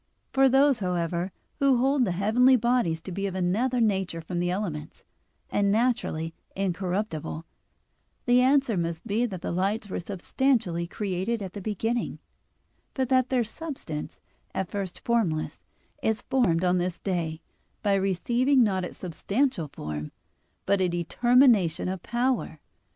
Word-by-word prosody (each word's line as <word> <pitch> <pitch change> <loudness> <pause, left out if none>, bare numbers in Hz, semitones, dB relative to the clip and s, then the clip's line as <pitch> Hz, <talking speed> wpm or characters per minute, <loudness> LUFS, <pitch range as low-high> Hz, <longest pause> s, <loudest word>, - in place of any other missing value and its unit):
For 270 0 +5
those, 270 0 +4
however, 180 -1 -1 0.3
who 275 -2 +4
hold 265 +1 +3
the 185 - -1
heavenly 225 +8 +4
bodies 235 -9 +1
to 190 - -8
be 195 +2 -2
of 190 - -5
another 215 +8 +1
nature 195 -6 +1
from 175 +2 -4
the 175 0 0
elements, 175 -5 -4 0.5
and 200 -1 +2
naturally 215 -8 0 0.2
incorruptible, 180 -4 -2 0.8
the 245 0 +5
answer 265 -4 +3
must 170 +1 -2
be 230 +3 +1
that 185 -5 -7
the - - -2
lights 200 +4 -1
were - - -2
substantially 195 -1 0
created 200 +3 -2
at 190 -1 -7
the 205 - -6
beginning, 225 +4 -2 0.8
but 260 -2 0
that 255 -1 +3
their 255 -2 +2
substance, 230 - -6 0.4
at 190 -1 -2
first 195 -3 -4
formless, 200 -10 0 0.4
is 220 -1 0
formed 185 -11 +2
on 180 0 +3
this 180 0 -2
day, 170 -5 -2 0.4
by 205 -2 +3
receiving 240 +8 +2
not 190 -4 +1
its 180 - -6
substantial 195 - -1
form, 75 - -6 0.5
but 200 -1 +2
a 185 - +3
determination 200 - +3
of 185 -1 -3
power. 240 - -1
200 Hz, 145 wpm, -27 LUFS, 175-245 Hz, 0.8 s, For